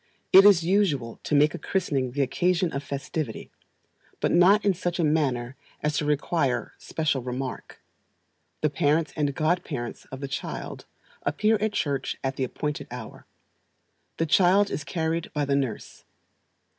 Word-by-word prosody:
It 195 +1 +10
is 195 -5 +7
usual 165 - +1
to 150 - +1
make 150 +1 +4
a - - -6
christening 145 -9 -1
the 140 0 +1
occasion 180 +4 +1
of 140 - -2
festivity; 140 -2 -5 0.7
but - - +1
not 190 +5 +5
in 200 - +4
such 175 -1 -3
a 175 - +1
manner 135 -5 0 0.3
as 150 0 0
to 150 - 0
require 140 -4 0
special 155 -4 -1
remark. 125 +1 -5 0.8
The 155 - +1
parents 150 +2 +1
and 145 -3 -1
god 165 +3 +1
parents 120 -6 -6
of 135 - -9
the 140 - -4
child 135 - -6 0.3
appear 210 +10 +2
at 215 -1 0
church 140 -7 -1
at 135 0 -1
the 135 - -2
appointed 150 +3 -4
hour. 120 -3 -9 0.9
The 165 - +1
child 190 +5 +4
is 150 - -3
carried 165 +1 -2
by 150 -1 0
the 140 0 +1
nurse. 130 -6 -3
150 Hz, 155 wpm, -26 LUFS, 135-175 Hz, 0.9 s, It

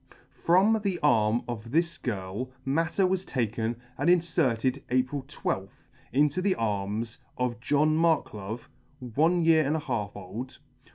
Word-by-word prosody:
FROM 200 +6 +3
the 195 -3 0
arm 115 -4 +3
of 115 -2 -5
this 170 +5 +1
girl 105 +2 -4 0.2
matter 165 +7 +1
was 185 0 0
taken 115 - -2 0.2
and 145 +5 +2
inferted 140 -7 +2
April 130 +3 +1
12th 95 -9 -4 0.3
into 150 +6 +2
the 190 0 +2
arms 105 +1 -2 0.2
of 125 -2 -1
John 150 +5 +2
Marklove, 120 -10 0 0.5
one 165 +5 +3
year 160 -1 +5
and 145 +2 0
a - - 0
half 115 -8 -3
old. 105 +7 -7
130 Hz, 135 wpm, -28 LUFS, 115-165 Hz, 0.5 s, year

